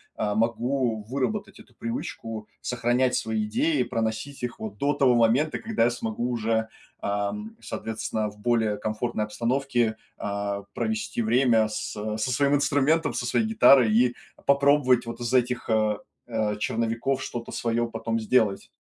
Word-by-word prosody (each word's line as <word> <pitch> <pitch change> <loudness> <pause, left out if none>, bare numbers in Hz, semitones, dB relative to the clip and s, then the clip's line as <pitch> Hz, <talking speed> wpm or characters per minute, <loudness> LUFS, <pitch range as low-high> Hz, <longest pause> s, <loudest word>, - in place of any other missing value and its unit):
а, 105 - -1
могу 115 +1 0
выработать 140 - -3
эту 120 - -17
привычку 115 -1 -5
сохранять 125 +1 +1
свои 110 -1 -1
идеи, 145 +5 +1
проносить 115 +3 -3
их 120 -1 -4
вот 105 -2 -6
до 145 +6 +1
того 135 -3 +4
момента, 120 +7 +3
когда 225 - 0
я 120 - +4
смогу 120 0 -3
уже, 110 -1 0 0.3
ам, 105 - -3
соответственно, 110 -1 -3
в 105 0 -16
более 110 -2 +1
комфортной 110 +1 -2
обстановке, 120 0 0 0.2
а, 100 0 -3
провести 110 0 -2
время 115 -1 +3
с 105 - -4
со 110 +3 -2
своим 140 +2 +3
инструментом, 150 +3 +2
со - - -2
своей 220 - +1
гитарой 140 - +6
и 120 +2 +3 0.3
попробовать 140 -3 +4
вот 115 0 -6
из 120 +1 -3
этих, 125 -1 +1
э, 110 -1 +2 0.3
э, 110 -3 -1
черновиков 115 +5 -1
что-то 120 -1 -5
свое 120 0 0
потом 115 0 -2
сделать. 110 -3 +2
115 Hz, 145 wpm, -26 LUFS, 110-130 Hz, 0.3 s, гитарой